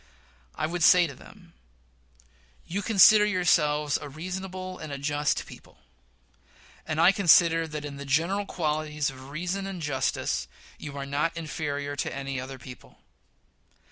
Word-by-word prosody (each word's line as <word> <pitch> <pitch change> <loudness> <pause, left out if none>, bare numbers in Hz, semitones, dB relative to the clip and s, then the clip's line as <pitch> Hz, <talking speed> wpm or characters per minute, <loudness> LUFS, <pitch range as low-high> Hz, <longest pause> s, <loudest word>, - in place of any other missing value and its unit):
I - - -1
would 175 +2 -3
say 180 +2 +7
to 145 - -6
them: - - -17 1.1
You 195 +4 -3
consider 210 0 +6
yourselves 150 -7 +2
a 145 - -7
reasonable 185 +4 -6
and 155 -2 -7
a 140 - -4
just 145 +1 -1
people; - - -15 1.1
and 155 0 -2
I 170 +3 +7
consider 170 -4 +4
that 150 -1 -6
in 140 -1 -7
the 140 - -7
general 170 +9 0
qualities 150 -3 -2
of 130 0 -12
reason 180 +6 -3
and 195 -2 -6
justice 70 - -1 0.3
you 145 -2 -7
are 140 - -4
not 150 +4 -1
inferior 145 -3 -4
to - - -3
any 135 -1 -4
other 130 +1 -8
people. 125 -1 -13
155 Hz, 145 wpm, -27 LUFS, 140-180 Hz, 1.1 s, say